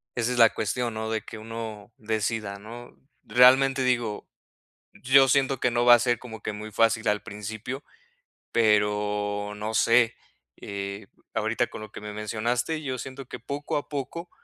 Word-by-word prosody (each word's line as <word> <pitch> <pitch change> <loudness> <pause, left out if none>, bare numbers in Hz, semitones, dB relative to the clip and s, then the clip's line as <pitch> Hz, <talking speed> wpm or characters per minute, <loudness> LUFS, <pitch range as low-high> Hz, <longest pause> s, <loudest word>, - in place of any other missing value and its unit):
esa 120 +1 0
es - - -3
la 115 -1 +8
cuestión, 120 +2 -2
¿no? 110 0 -4
De 110 -1 -1
que 110 - -10
uno 110 -1 -7
decida, 110 -2 -2
¿no? 120 +3 -11 0.3
Realmente 130 +2 +5
digo, 120 -4 -1 0.7
yo 135 +1 +5
siento 135 -1 +2
que 125 - +2
no 120 0 +1
va 120 - +9
a 120 - +7
ser 120 -2 +1
como 110 -3 -10
que - - -3
muy 105 +1 -7
fácil 115 0 +2
al 105 0 +1
principio, 110 +5 -6 0.7
pero 105 -1 +1
no 110 +1 -4
sé, 115 +1 +4 0.4
eh, 100 0 -6
b - - -33
ahorita - - 0
con - - -9
lo 110 - -9
que - - -8
me 105 0 -7
mencionaste, 120 +8 -2
yo 130 -3 -3
siento 135 +2 -7
que 125 - -8
poco 140 +5 -4
a 145 - -3
poco 150 +5 -5
115 Hz, 175 wpm, -26 LUFS, 105-125 Hz, 0.7 s, va